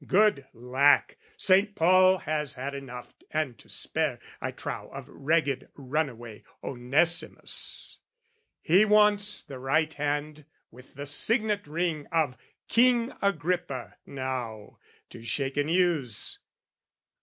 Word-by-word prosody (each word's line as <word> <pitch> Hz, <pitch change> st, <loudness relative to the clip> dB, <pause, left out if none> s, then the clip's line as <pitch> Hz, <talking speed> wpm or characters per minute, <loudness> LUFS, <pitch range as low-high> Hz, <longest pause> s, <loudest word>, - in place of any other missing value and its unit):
Good 195 Hz, -9 st, +3 dB
lack! 130 Hz, -, +2 dB, 0.2 s
"Saint 200 Hz, -, +3 dB
Paul 185 Hz, +2 st, +5 dB
has 150 Hz, -4 st, -1 dB
had 135 Hz, +3 st, -5 dB
enough 130 Hz, -3 st, -8 dB, 0.2 s
and 155 Hz, -6 st, -2 dB
to -, -, -17 dB
spare, -, -, -2 dB, 0.2 s
I -, -, -2 dB
trow, -, -, -6 dB
"Of -, -, -8 dB
ragged 145 Hz, -2 st, -1 dB
run 145 Hz, +2 st, -1 dB
away 115 Hz, -3 st, -11 dB, 0.2 s
Onesimus: 140 Hz, +7 st, 0 dB, 0.6 s
"He 185 Hz, +6 st, +5 dB
wants 210 Hz, -1 st, +4 dB
the 135 Hz, -2 st, -9 dB
right 155 Hz, +4 st, +1 dB
hand 150 Hz, 0 st, -3 dB, 0.3 s
with 125 Hz, +3 st, -17 dB
the 140 Hz, +1 st, -6 dB
signet 210 Hz, -, +1 dB
ring 160 Hz, -1 st, -2 dB
"Of 155 Hz, -6 st, +1 dB, 0.3 s
King 240 Hz, +1 st, +3 dB
Agrippa, 175 Hz, -7 st, -2 dB
now, 130 Hz, -6 st, -5 dB, 0.3 s
to 115 Hz, -, -10 dB
shake 135 Hz, +4 st, -2 dB
and 145 Hz, +1 st, 0 dB
use. 165 Hz, -, +1 dB
150 Hz, 120 wpm, -27 LUFS, 135-180 Hz, 0.6 s, Paul